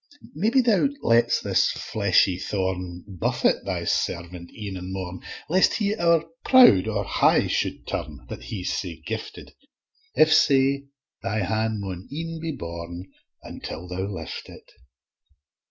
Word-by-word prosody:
Maybe 220 - +3
Thou 235 +2 +3
lets 115 +1 +3
this - - +2
fleshly 90 -1 +1
thorn 90 -3 -3
Buffet 95 -5 0
Thy - - -2
servant 85 0 -2
e'en 105 -3 -6
and 90 0 -6
morn, 90 -2 -5 0.3
Lest 185 +4 +3
he 205 -2 0
owre 170 -4 +2 0.2
proud 245 - +7
and 100 -2 -1
high - - +3
shou'd - - -2
turn, 75 -6 -5
That - - -8
he's 95 -5 -3
sae 85 -4 -5
gifted: 110 0 -6 0.6
If 155 0 +5
sae, 140 -2 +3 0.3
Thy 105 +1 -1
han' 110 +3 -1
maun 95 -2 -6
e'en 165 +2 -5
be 165 0 -3
borne, 85 - -7 0.3
Until 85 +3 -7
Thou 95 +2 -3
lift 100 -2 -7
it. - - -14
100 Hz, 140 wpm, -24 LUFS, -, 0.6 s, proud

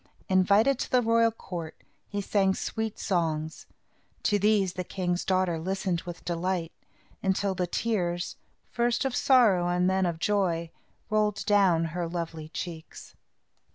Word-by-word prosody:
Invited 200 +8 +4
to - - -3
the 250 -1 +3
royal 230 0 +4
court, 175 -7 -7 0.3
he 205 -1 -3
sang 195 -1 +2
sweet 220 -1 -3
songs. 160 -4 -2 0.6
To 205 -1 +2
these 200 -3 +2
the 185 - -3
king's 180 -1 -2
daughter 185 -3 +1
listened 185 0 -2
with 175 -1 -8
delight, 175 -1 -2 0.5
until 195 0 0
the 180 -1 -1
tears, 175 -4 -1 0.4
first 240 +2 +1
of 260 -2 -1
sorrow 215 -10 +4
and 180 +1 +1
then 190 -1 +2
of 170 -2 -2
joy, 170 -3 0 0.4
rolled 210 -1 +1
down 195 -5 +4
her 175 -1 -2
lovely 165 -2 -5
cheeks. 165 -1 -8
185 Hz, 140 wpm, -28 LUFS, 175-210 Hz, 0.6 s, Invited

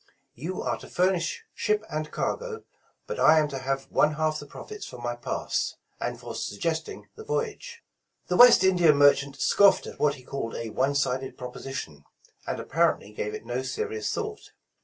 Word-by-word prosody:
You 165 +10 -5
are - - -1
to - - -11
fur 180 +2 +2
nish 170 -2 -2
ship 210 0 0
and 155 0 -3
cargo, 485 -2 -3 0.4
but 475 - -5
I 160 - +7
am 155 -1 +4
to 135 -2 -4
have 135 +1 -2
one 150 0 +3
half 155 0 0
the 145 - -10
profits 425 - -9
for - - -9
my 120 0 -3
pass, 120 - -2 0.2
and - - -3
for - - -7
suggesting 160 +10 -3
the 440 - -9
voyage." 465 +1 -4 0.4
The 180 - -1
West 245 -1 +9
India 175 -4 +5
merchant 140 -1 +4
scoffed 200 +7 +5
at - - -9
what 145 -1 +2
he 130 - -14
called 125 -3 -4
a 115 -1 -4
one 135 +5 +1
sided 130 -1 -1
proposition, 125 - -7 0.4
and - - -2
apparently 100 - +1
gave 105 0 -4
it - - -9
no 120 +2 -2
serious 110 -4 -3
thought. - - -5
145 Hz, 180 wpm, -27 LUFS, 130-185 Hz, 0.4 s, West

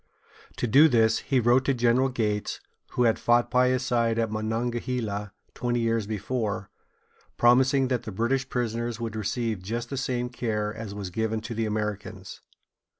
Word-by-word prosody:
To - - -1
do 140 +8 +6
this, 115 -3 +3
he 135 -2 +1
wrote 120 +2 +4
to 135 - +2
General 125 +2 +3
Gates, 105 -5 -2 0.3
who 125 - +2
had 115 -2 +3
fought 120 0 +2
by 125 0 +4
his 130 0 +1
side 115 -3 +1
at 115 -2 0
Monongahela 110 -1 -2 0.2
twenty 120 0 -1
years 115 -2 0
before, 105 -2 -3 0.7
promising 130 +2 +4
that 125 -3 0
the 110 - -7
British 130 +6 0
prisoners 120 -1 -2
should 115 -1 -5
receive 110 -1 -2
just 115 +6 -4
the 135 - -3
same 125 -2 -1
care 105 -4 -2
as 110 -3 -7
was 100 -3 -5
given 110 +2 -1
to 115 +2 -6
the 115 -1 -1
Americans. 105 -2 -4
115 Hz, 165 wpm, -26 LUFS, 110-125 Hz, 0.7 s, do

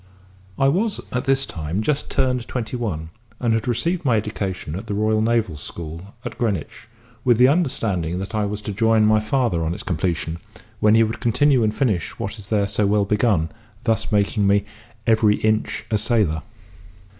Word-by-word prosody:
I 135 - +3
was 200 +9 +1
at 125 - -2
this 135 0 +2
time 80 +6 -3
just 150 +4 0
turned 125 -3 0
twenty 125 -1 -3
one, 85 -10 -3 0.3
and 120 -2 +1
had 115 +1 -1
received 165 +9 0
my 125 -5 +3
education 100 -7 -3
at 95 - -6
the 100 - -2
Royal 110 +1 +2
Naval 110 -8 +1
School 85 +5 -7
at - - -6
Greenwich, 110 -1 -2 0.4
with 120 -3 +4
the 125 +2 +7
understanding 110 - 0
that 95 +3 -5
I 105 -1 +1
was 105 +1 -4
to - - -3
join 110 +1 +3
my 110 0 +4
father 110 -6 0
on 80 +2 -1
its - - -6
completion, 85 -1 -2 0.4
when 105 +1 +5
he 115 - +6
would 110 +1 -2
continue 130 +3 +3
and 110 0 0
finish 105 - 0
what 110 +3 -5
is 100 - -10
there 105 -2 +1
so 105 0 +1
well 105 0 +2
begun, 105 -6 +2 0.3
thus 115 -3 0
making 105 0 +2
me 100 0 +3 0.4
"every 110 -2 +4
inch 110 0 0
a 105 - +2
sailor." 105 -8 +1
110 Hz, 185 wpm, -22 LUFS, 100-120 Hz, 0.4 s, the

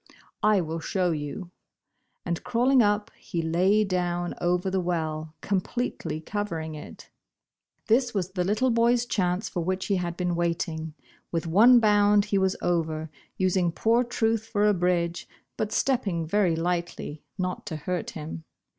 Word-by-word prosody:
'* - - -36
I 195 - +3
will 165 0 -4
show 180 +1 0
you," 160 +4 -5 0.7
and 170 -1 -2
crawling 250 +2 +3
up, 210 -1 +1
he 170 - -4
lay 185 +6 +3
down 175 -2 -1
over 180 +2 +1
the 190 - +1
well, 160 -3 -2
completely 200 -3 -2
covering 165 -3 -4
it. 150 - -11 0.7
This 245 +2 +3
was 190 -4 -2
the 185 -2 -1
little 215 +7 +1
boy's 235 +1 +3
chance, 185 -2 0
for 175 - -3
which 185 +2 -1
he 200 - +1
had 175 -1 -3
been 180 -1 0
waiting. 165 -2 -2 0.4
With 165 0 -1
one 225 +9 +7
bound 205 -1 +4
he 205 -2 +1
was 190 0 +1
over, 160 -3 -1 0.3
using 185 -2 +2
poor 230 +7 +2
Truth 225 -2 0
for 205 -2 +1
a 210 - +4
bridge, 175 -2 0 0.3
but 215 -1 -2
stepping 200 -11 0
very 180 0 +2
lightly, 170 -3 -3 0.2
not 185 -1 -3
to 160 - -4
hurt 175 +4 -3
him. 160 +1 -6
180 Hz, 155 wpm, -26 LUFS, 170-210 Hz, 0.7 s, one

